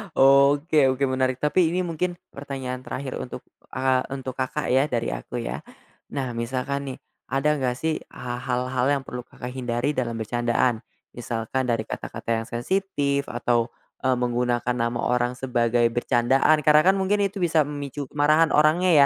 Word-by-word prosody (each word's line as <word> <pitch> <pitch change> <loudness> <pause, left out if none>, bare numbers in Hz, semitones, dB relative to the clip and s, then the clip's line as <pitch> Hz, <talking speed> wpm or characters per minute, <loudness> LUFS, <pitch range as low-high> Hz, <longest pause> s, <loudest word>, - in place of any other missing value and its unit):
Oke 140 +2 +5
oke, 130 +1 0
menarik, 130 -1 0
tapi 155 +3 +3
ini 180 +3 0
mungkin 175 +1 -2 0.2
pertanyaan 135 -2 -5
terakhir 130 -1 -4
untuk, 125 - -6 0.3
eee, 130 -1 +2
untuk 130 -1 -6
Kakak 130 -1 -2
ya, 135 +3 +4
dari 120 - -1
aku - - -5
ya. - - -4 0.5
Nah, 130 -3 -2
misalkan 130 +3 -2
nih, - - -11 0.3
ada 150 +2 +1
nggak 125 -2 0
sih, 160 +3 -1 0.2
ha 120 -1 -5
hal-hal 125 0 -1
yang 135 -1 -1
perlu 125 -1 -7
Kakak 125 0 -8
hindari 125 +2 -1
dalam 115 -2 -1
bercandaan. 120 +1 0 0.4
Misalkan 120 +2 -2
dari 115 -2 0
kata-kata 115 +1 -7
yang - - -13
sensitif, 140 +1 -1
atau, 120 0 0 0.4
eee, 130 -1 +3
menggunakan 125 0 0
nama 120 0 -1
orang 125 0 +1
sebagai 120 -2 +1
bercandaan, 130 +5 +3
karena 150 +1 +6
kan - - -2
mungkin 195 +2 +1
itu 195 -1 -4
bisa 160 -4 +3
memicu 145 -1 -5
kemarahan 155 +2 +3
orangnya 160 +4 +4
130 Hz, 155 wpm, -24 LUFS, 120-145 Hz, 0.5 s, karena